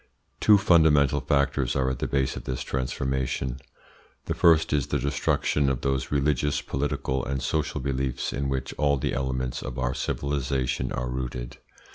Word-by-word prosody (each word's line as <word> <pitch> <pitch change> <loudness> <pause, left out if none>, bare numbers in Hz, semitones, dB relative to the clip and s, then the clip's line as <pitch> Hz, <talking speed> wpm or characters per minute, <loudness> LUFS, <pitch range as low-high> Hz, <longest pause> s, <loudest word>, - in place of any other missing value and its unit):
Two 105 -1 +6
fundamental 75 -7 +4
factors 70 -3 +1
are 65 -1 +1
at 65 -1 -2
the - - -1
base 70 -2 0
of - - -7
this 65 -1 -3
transformation. 65 0 -2 0.7
The - - -1
first 80 -3 +4
is 70 -3 +1
the - - 0
destruction 70 +1 +1
of 65 -3 -2
those 70 -2 -1
religious, 75 0 +1
political, 65 -1 -2
and 70 0 -2
social 75 +4 -1
beliefs 65 -1 -2
in 70 -1 -2
which 65 -1 -3
all 70 -1 +3
the - - -2
elements 65 -1 -2
of 65 0 -6
our 65 0 0
civilisation 65 -2 -1
are 65 - -2
rooted. 60 -1 -5
65 Hz, 160 wpm, -26 LUFS, 65-70 Hz, 0.7 s, Two